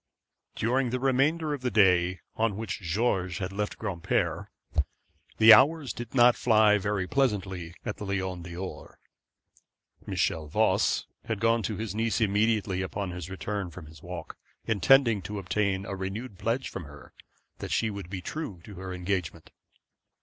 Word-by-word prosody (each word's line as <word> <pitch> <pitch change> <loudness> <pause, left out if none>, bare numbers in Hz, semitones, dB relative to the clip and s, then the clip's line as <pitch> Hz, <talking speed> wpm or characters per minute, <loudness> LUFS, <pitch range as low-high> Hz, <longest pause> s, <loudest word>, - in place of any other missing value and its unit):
During 125 +3 +1
the 125 +2 -1
remainder 145 +4 +2
of 140 - -4
the 125 - 0
day 90 -4 +3
on 110 -3 0
which 110 -4 -4
George 95 -1 0
had 95 0 -4
left 105 +1 -3
Granpere, 95 -7 -1 0.9
the 110 0 +10
hours 140 +3 +4
did 120 +2 -8
not 120 -1 +6
fly 110 -3 +4
very 100 -1 -1
pleasantly 95 -9 -1
at 105 - -3
the 105 - -6
Lion 95 -2 -2
d'Or. 85 +2 -8 1.1
Michel 80 -2 0
Voss 75 - +2 0.2
had 110 -3 -2
gone 115 +2 +3
to 105 -1 -3
his 110 -3 -4
niece 115 +1 0
immediately 105 -3 +1
upon 95 0 -3
his 90 -1 -6
return 100 0 -4
from 85 0 -10
his 75 0 -14
walk, 90 0 -8 0.3
intending 115 +1 +4
to 105 +3 -6
obtain 95 0 -1
a - - -5
renewed 95 +3 -5
pledge 115 +4 -1
from 90 - -7
her 75 0 -14 0.5
that - - -5
she 110 -1 +1
would 100 -4 -7
be 95 -2 -5
true 150 - -5
to 105 - -11
her 95 0 -6
engagement. 90 -3 -3
100 Hz, 155 wpm, -28 LUFS, 90-115 Hz, 1.1 s, the